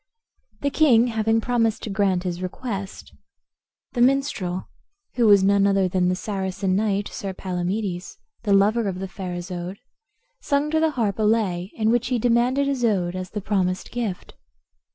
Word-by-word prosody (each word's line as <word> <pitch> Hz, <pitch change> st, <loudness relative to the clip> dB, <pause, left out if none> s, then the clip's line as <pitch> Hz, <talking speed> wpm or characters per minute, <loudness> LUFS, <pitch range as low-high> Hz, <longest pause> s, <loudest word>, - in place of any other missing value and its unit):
The 280 Hz, -, 0 dB
king 250 Hz, -7 st, +5 dB
having 225 Hz, 0 st, +1 dB
promised 230 Hz, -2 st, 0 dB
to 215 Hz, -, -4 dB
grant 190 Hz, -2 st, +1 dB
his 180 Hz, -1 st, -3 dB
request, 195 Hz, +1 st, -6 dB, 0.8 s
the 240 Hz, -, -1 dB
minstrel, 245 Hz, -9 st, +1 dB, 0.5 s
who 240 Hz, -2 st, +3 dB
was 200 Hz, -2 st, +6 dB
none 200 Hz, 0 st, +4 dB
other 195 Hz, -1 st, +2 dB
than 180 Hz, 0 st, +1 dB
the 185 Hz, -, +1 dB
Saracen 190 Hz, -1 st, -2 dB
knight, 205 Hz, -1 st, 0 dB
Sir 195 Hz, -1 st, -5 dB
Palamedes, 185 Hz, 0 st, -3 dB, 0.2 s
the 210 Hz, -, -2 dB
lover 205 Hz, +3 st, +3 dB
of 185 Hz, -2 st, -3 dB
the 190 Hz, +1 st, -4 dB
fair 185 Hz, -1 st, -6 dB
Isoude, 175 Hz, +1 st, -5 dB, 0.6 s
sung 285 Hz, +1 st, 0 dB
to 315 Hz, -, +2 dB
the 320 Hz, 0 st, +3 dB
harp 215 Hz, -3 st, 0 dB
a -, -, +1 dB
lay, 205 Hz, -5 st, +1 dB
in 220 Hz, 0 st, +1 dB
which 240 Hz, 0 st, +1 dB
he 250 Hz, -1 st, 0 dB
demanded 245 Hz, +4 st, +2 dB
Isoude 215 Hz, -10 st, 0 dB
as 185 Hz, 0 st, -5 dB
the 210 Hz, -, -5 dB
promised 185 Hz, -2 st, -1 dB
gift. 225 Hz, -7 st, -4 dB
200 Hz, 165 wpm, -23 LUFS, 185-235 Hz, 0.8 s, was